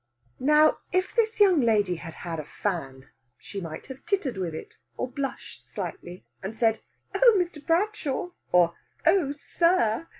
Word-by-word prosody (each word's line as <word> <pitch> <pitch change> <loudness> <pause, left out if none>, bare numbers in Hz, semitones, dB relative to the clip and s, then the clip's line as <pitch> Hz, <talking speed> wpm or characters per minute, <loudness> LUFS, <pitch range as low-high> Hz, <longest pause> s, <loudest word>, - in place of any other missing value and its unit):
Now, 300 +3 +5
if 370 +1 0
this 450 -2 +1
young 375 -7 +6
lady 205 -6 +2
had 165 -1 -9
had 165 -2 -3
a - - -4
fan, 140 -7 -4 0.3
she 200 - -7
might 165 -3 -7
have 265 0 -10
tittered 370 - 0
with 180 -4 -3
it, - - -9 0.2
or - - -1
blushed 270 +2 -5
slightly, 175 +1 -7 0.2
and 195 +3 -5
said, 225 -1 +2 0.3
"Oh, 480 -3 +6
Mr. 340 -5 -2
Bradshaw!" 355 -2 0 0.2
or, 175 -1 +5 0.3
"Oh, 335 -8 +4
sir!" 330 -2 +1
265 Hz, 155 wpm, -27 LUFS, -, 0.3 s, young